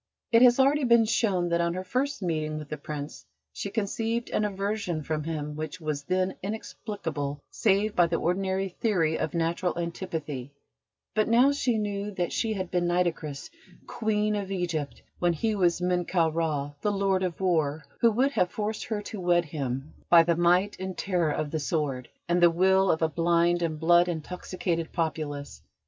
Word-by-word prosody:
It 230 0 +6
has 245 0 +6
already 280 +2 +4
been 235 -2 +5
shown 195 -6 +1
that 170 0 +2
on 170 0 0
her 185 - -3
first 255 +4 -2
meeting 155 -3 -1
with 150 -1 -8
the - - -3
Prince 145 0 -7 0.3
she 200 - -4
conceived 225 +3 -2
an - - +1
aversion 200 -4 -2
from 155 0 -3
him 150 -2 -4
which 155 +3 -5
was 150 -3 -3
then 185 +1 0
inexplicable 175 -8 -4
save 205 0 +1
by 175 -1 +5
the 165 - -1
ordinary 190 +3 0
theory 175 -5 0
of - - -2
natural 170 +2 0
antipathy: 160 -6 -4 0.6
but 215 -1 +2
now 245 +5 +5
she 255 -5 0
knew 205 -1 -2
that 175 -2 -1
she 225 -2 0
had 185 -3 -4
been 175 -1 +1
Nitocris, 170 - -1 0.3
Queen 215 -1 0
of 200 -2 -3
Egypt, 170 -6 -3 0.2
when 175 -1 +2
he 215 +8 0
was 180 -4 +2
Menkau 180 -2 +1
Ra, 150 -4 -1
the 210 - +1
Lord 195 -1 +1
of 180 -3 -2
War, 160 -5 +1 0.2
who 235 - +5
would 255 +6 +2
have 180 -10 +1
forced 210 +1 -3
her 210 -2 -3
to 205 -1 -6
wed 175 -1 +3
him 140 -2 -4 0.2
by 170 -1 +8
the 170 0 +2
might 180 +4 +3
and 190 -1 -5
terror 180 -5 0
of 150 0 -2
the 160 - -1
sword, 140 -5 -2 0.2
and 175 +1 +2
the 175 - +8
will 190 +3 +3
of 160 - +2
a - - +4
blind 170 +2 +2
and 160 -2 -1
blood 175 +2 +5
intoxicated 175 0 -3
populace. 150 -3 -3
175 Hz, 180 wpm, -27 LUFS, 160-200 Hz, 0.6 s, by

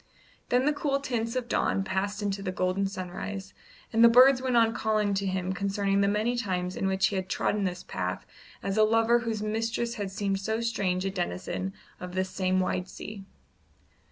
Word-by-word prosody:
Then 250 +2 +3
the 300 - +3
cool 285 -1 0
tints 235 -3 -2
of 250 -2 -2
dawn 195 -4 +1
passed 195 +2 -2
into 200 -1 -1
the 185 - -2
golden 185 +2 0
sunrise, 190 +1 -6 0.4
and 225 +1 +5
the 235 - +10
birds 255 +2 +7
went 255 -2 +1
on 225 -1 +4
calling 215 -3 +1
to 195 0 -1
him 185 0 -1
concerning 200 +1 0
the 200 - +3
many 215 +4 +1
times 185 -6 -2
in 195 - -1
which 190 0 +2
he 200 - -2
had 185 0 -3
trodden 205 -1 0
this 180 0 -3
path - - -4 0.4
as 195 +1 -2
a 215 - +6
lover 225 +2 +4
whose 225 -3 -3
mistress 230 +2 -1
had 200 - -2
seemed 195 0 -1
so 220 +3 -1
strange 195 -5 -1
a 195 - 0
denizen 95 - -3 0.3
of 180 0 -7
this 185 0 -1
same 185 -1 +1
wide 185 0 -1
sea. 200 -2 -8
200 Hz, 195 wpm, -28 LUFS, 190-225 Hz, 0.4 s, the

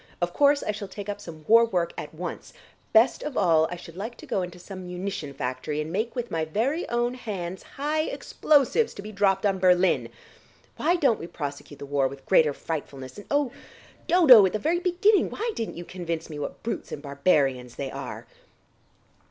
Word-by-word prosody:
Of 175 0 -1
course 285 0 +4
I - - 0
shall 205 -1 -6
take 205 +1 -8
up 205 0 -4
some 160 -5 -10
war 230 +1 +7
work 180 -7 0
at - - -6
once; - - -7 0.4
best 230 +3 +4
of 295 -3 -5
all 160 -4 +4
I 180 - -4
should 170 -1 -12
like 220 +6 -6
to - - -11
go 240 -9 -1
into 180 0 -6
some 185 0 -9
munition 180 -4 -4
factory 130 +3 -3
and 150 +1 -3
make 220 +7 -2
with 245 -1 -4
my 165 -1 0
very 235 - -1
own 240 +1 0
hands 190 -7 -5
high 305 +3 -2
explosives 300 - +1
to 200 - -8
be 215 - -7
dropped 195 -1 +2
on 195 -2 +1
Berlin. 180 0 +3 0.7
Why 345 +3 +2
don't 275 -10 +2
we 165 - -6
prosecute 145 -2 -6
the 140 - -8
war 140 -1 +1
with 135 0 -10
greater 160 -5 +4
frightfulness, 140 0 -6
and, 205 - -12
oh, 285 -3 +1 0.6
Dodo, 315 - +8
at - - -5
the - - +1
very 325 +9 0
beginning 370 +3 +3
why 460 +2 -3
didn't 225 - -4
you 175 - -7
convince 170 -3 -5
me 150 - -6
what 145 - -6
brutes 230 - -4
and - - -5
barbarians 140 -4 +1
they 135 -1 -4
are!" 135 -2 -7
190 Hz, 200 wpm, -26 LUFS, 160-240 Hz, 0.7 s, Dodo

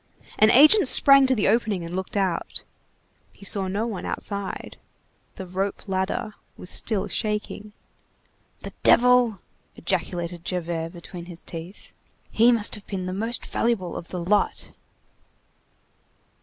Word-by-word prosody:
An 215 - +6
agent 305 - +6
sprang 275 +1 +7
to 260 - +2
the 210 - 0
opening 215 -4 +1
and 170 +2 -6
looked 190 +2 -4
out. 190 -4 -2 0.7
He 200 - -14
saw 195 -1 +1
no 200 +4 -2
one 215 -6 -5
outside. 200 -2 -5 0.6
The 190 - -7
rope 190 +3 -4
ladder 190 +3 -2 0.2
was 180 - -1
still 215 -4 0
shaking. 210 -1 -4 0.9
"The - - -8
devil!" 245 -5 +4 0.3
ejaculated 175 -1 -3
Javert 170 -2 -3
between 175 0 -10
his 175 -1 -11
teeth, 170 +4 -10 0.4
"he 235 +2 +5
must 230 -3 0
have 210 -2 -9
been 190 -2 -4
the 185 - -4
most 225 +5 -2
valuable 225 -7 -1
of 170 - -7
the 180 - -6
lot." 185 +4 0
195 Hz, 135 wpm, -24 LUFS, 180-220 Hz, 0.9 s, sprang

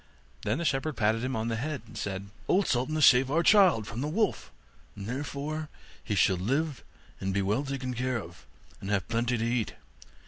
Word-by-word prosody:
Then 105 - 0
the 170 - -2
shepherd 140 0 0
patted 110 +1 +2
him 130 +1 -1
on 110 +1 -1
the 115 - -1
head, 140 +1 -3
and 110 - -14
said, 100 0 -4 0.2
'Old 195 +1 +3
Sultan 130 +5 0
has 155 - +5
saved 130 +1 +6
our 165 +4 +2
child 185 - +5
from 115 +3 -5
the 145 - -1
wolf, 205 +6 -1 0.4
and 100 - -7
therefore 145 +5 -4 0.3
he 105 - -2
shall 95 -1 +4
live 135 - -1 0.4
and 95 0 -2
be 100 - +2
well 105 +8 +1
taken 135 -2 -3
care 125 +1 -1
of, 80 - -12 0.3
and 95 - -6
have 100 -4 0
plenty 120 +1 0
to 115 - -1
eat. 120 -1 -1
125 Hz, 205 wpm, -29 LUFS, 105-145 Hz, 0.4 s, saved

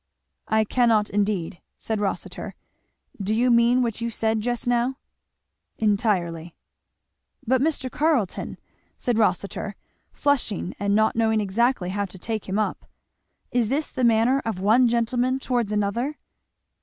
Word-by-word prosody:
"I 220 0 +3
cannot 220 -2 +2
indeed," 200 -3 -1 0.2
said 220 -2 -3
Rossitur. 200 -2 -4 0.7
"Do 205 +3 0
you 245 +2 +3
mean 235 +2 +4
what 230 -1 -3
you 235 - -1
said 220 -1 0
just 240 +1 -2
now?" 245 +2 +1 0.8
"Entirely." 185 -6 0 0.9
"But 255 +2 +2
Mr. 280 -4 0
Carleton," 295 - 0 0.4
said 240 -2 0
Rossitur, 200 0 0 0.4
flushing 250 -10 0
and 200 +1 +1
not 220 +1 +3
knowing 220 -1 +2
exactly 210 0 +1
how 200 +2 -1
to 190 0 -11
take 215 +1 -4
him 190 - -1
up, 215 - -2 0.6
"is 240 -3 +1
this 290 +4 -1
the 255 - -3
manner 235 +4 +4
of 220 -5 -3
one 225 +6 +4
gentleman 240 +2 +1
towards 245 -5 -1
another?" 210 +8 -1
225 Hz, 135 wpm, -24 LUFS, 205-245 Hz, 0.9 s, mean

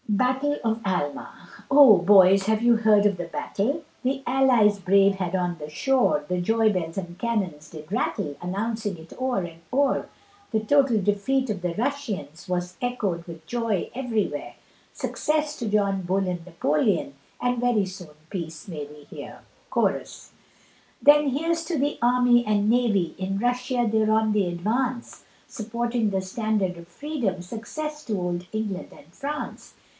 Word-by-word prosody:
BATTLE 260 +7 +1
OF 225 0 0
ALMA 175 -8 -3 0.2
Oh! 275 -7 +8
boys 190 +1 +6
have 220 0 +2
you 235 -1 +5
heard 215 -2 +4
of 200 -2 +2
the 175 - -4
battle, 240 - -2 0.2
The 270 +1 0
allies 245 -5 +4
brave 195 +1 +4
had 185 -1 -2
on 175 -2 -1
the 150 -1 -7
shore, 245 - +1
The 180 +1 -1
joybells 200 -5 +1
and 175 -2 -5
cannons 185 -10 -2
did 155 +1 -11
rattle, 200 - -1
Announcing 205 +2 -3
it 160 +1 -13
o'er 255 -7 0
and 165 -1 -11
o'er, 275 +1 +1 0.4
The 220 - +2
total 255 0 +3
defeat 215 +7 0
of 195 -3 -4
the 175 -1 -2
Russians, 210 - -3
Was 180 0 -2
echoed 205 -9 -2
with 165 -2 -10
joy 230 -3 -1
everywhere; 240 -5 -2 0.4
Success 300 0 -1
to 230 -3 -2
John 200 -2 +1
Bull 190 +2 0
and 175 -2 -3
Napolean, 165 -1 0 0.3
And 245 -1 0
very 240 -5 +2
soon 185 -3 -9 0.2
peace 165 -4 -6
may 155 -5 -5
we 150 0 -14
hear. - - -10 0.3
CHORUS. - - -1 0.7
Then 295 0 +6
here's 330 +5 0
to 335 -2 -2
the 285 +2 0
army 245 0 +4
and 210 0 +2
navy, 220 -7 +2
In 190 +1 -2
Russia 245 +1 0
they're 215 0 +2
on 220 -1 +3
the 205 -3 +2
advance, 235 +8 -2 0.2
Supporting 235 0 -2
the 190 -1 -1
standard 195 -1 -1
of 170 0 -12
freedom, 235 - -3
Success 300 - -6
to 215 -4 -1
old 180 0 -3
England 210 -4 -3
and 145 - -16
France. 295 - -6
210 Hz, 155 wpm, -25 LUFS, 180-245 Hz, 0.7 s, Oh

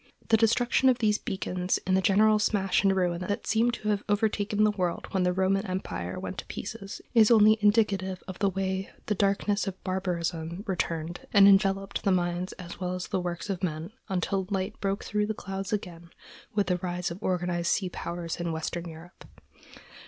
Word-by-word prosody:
The 225 - +6
destruction 235 +4 +3
of 250 - +3
these 215 -3 +2
beacons 185 -1 -2
in 185 - +1
the 190 - +4
general 215 +3 +4
smash 195 -3 +2
and 195 -1 +4
ruin 175 -2 0
that 205 - -2
seem 225 +2 +2
to 215 -3 -3
have 205 -1 +1
overtaken 205 0 +1
the 215 - +4
world 180 -4 -2
when 190 - +1
the 180 0 +2
Roman 190 +2 +1
empire 140 - -4
went - - -5
to - - -7
pieces 195 0 -7
is 225 -3 +6
only 215 -1 +6
indicative 200 -3 +2
of 185 -2 -7
the 200 - +3
way 190 0 -2 0.2
the 210 - 0
darkness 200 +1 +1
of 190 -1 -4
barbarism 175 -2 -2
returned 170 -3 -3
and 200 -1 +8
enveloped 195 0 +3
the 195 - +2
minds 175 0 0
as 175 -1 -9
well 180 -1 -2
as 180 - -5
the 185 - 0
works 175 +1 -4
of 195 -3 -3
men, 165 0 -3 0.2
until 190 +1 -1
light 195 0 -1
broke 195 0 -1
through 210 0 -1
the 220 - -2
clouds 195 -1 -5
again 170 -5 -4 0.5
with 205 -1 +2
the 180 - +1
rise 180 -1 -3
of 175 +4 -8
organized 175 -3 0
sea 190 -3 0
powers 170 -1 -5
in 175 -1 -2
Western 170 +2 -4
Europe. 165 +3 -12
190 Hz, 190 wpm, -28 LUFS, 180-205 Hz, 0.5 s, and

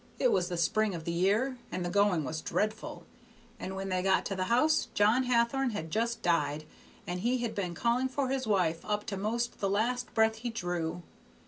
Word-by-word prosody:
It - - +3
was 180 0 +1
the 175 - -3
spring 210 +3 +1
of 165 - -6
the 170 - -2
year, 210 +9 +1
and 180 -1 -2
the - - -1
going 200 -5 +3
was 155 +4 -4
dreadful, 215 +1 -2 0.5
and 190 -2 -5
when 195 0 -4
they 185 -1 0
got 190 0 +2
to 195 - -2
the 185 0 -1
house 305 +9 +3
John 220 +5 +4
Hathorn 245 +1 +2
had 160 -6 -5
just 230 +3 -1
died, 155 -3 +1 0.4
and 180 -2 -3
he 240 +6 +1
had 230 -2 -2
been 185 -5 -3
calling 240 +6 +1
for 260 0 -1
his 265 -2 -1
wife 180 -6 +1
up 210 0 -2
to 200 - -3
'most 230 +5 -2
the 195 - 0
last 245 +5 0
breath 220 0 +3
he 240 +2 -4
drew. 175 -5 -3
210 Hz, 210 wpm, -30 LUFS, 180-235 Hz, 0.5 s, John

